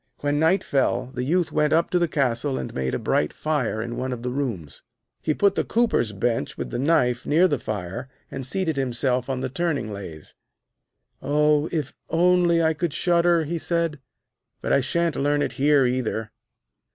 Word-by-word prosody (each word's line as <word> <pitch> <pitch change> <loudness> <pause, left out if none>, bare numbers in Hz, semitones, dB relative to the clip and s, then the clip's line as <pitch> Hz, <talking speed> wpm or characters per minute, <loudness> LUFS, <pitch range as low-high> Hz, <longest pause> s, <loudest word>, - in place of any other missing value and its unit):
When 145 0 0
night 165 +5 +3
fell, 130 -2 0
the 125 - -3
Youth 170 +5 +1
went 150 0 +2
up 165 +1 +2
to 180 - +3
the 170 - +2
castle 135 -2 0
and - - -5
made 65 -1 -2
a - - 0
bright 75 - 0
fire 130 -8 -1
in 120 0 -5
one 130 0 -2
of 120 -1 -5
the 125 - -2
rooms. 115 - -4 0.4
He 155 - 0
put 200 -1 +3
the - - 0
cooper's 225 - +1
bench 115 +4 -2
with - - -5
the 120 - -2
knife 130 -4 +1
near 170 +5 +4
the 145 -7 -1
fire, 110 +5 -5 0.2
and 135 - -5
seated 160 +3 -1
himself 125 0 0
on 130 -1 -2
the 130 - -1
turning 145 -7 -2
lathe. 85 -7 -9 0.9
'Oh, 150 +1 +2
if 150 -5 -2 0.2
only 175 0 +3
I 160 0 +3
could 155 -1 -3
shudder,' 170 0 +3
he 165 +3 -3
said; 165 -3 -1 0.6
'but - - -1
I - - +5
shan't 165 +5 0
learn 145 +1 +1
it - - -2
here 145 -2 +5
either.' 120 -4 -2
145 Hz, 190 wpm, -24 LUFS, 125-165 Hz, 0.9 s, I